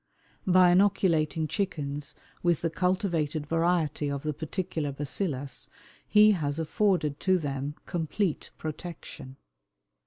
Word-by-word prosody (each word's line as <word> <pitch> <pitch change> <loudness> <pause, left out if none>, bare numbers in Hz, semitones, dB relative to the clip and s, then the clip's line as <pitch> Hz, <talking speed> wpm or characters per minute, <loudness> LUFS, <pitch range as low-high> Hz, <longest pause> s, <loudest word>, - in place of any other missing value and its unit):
By 180 -1 +6
inoculating 170 -5 +3
chickens 150 -6 -3 0.3
with 175 -3 +2
the 165 - 0
cultivated 170 -4 0
variety 165 -2 +1
of 140 -1 -3
the 155 -1 -1
particular 160 -1 -3
"bacillus" 140 -1 -3 0.4
he 215 0 +7
has 150 -7 -1
afforded 160 -3 +1
to 185 -1 +3
them 145 -2 -3
complete 175 +1 -2
protection. 155 -4 -7
160 Hz, 105 wpm, -28 LUFS, 145-180 Hz, 0.4 s, he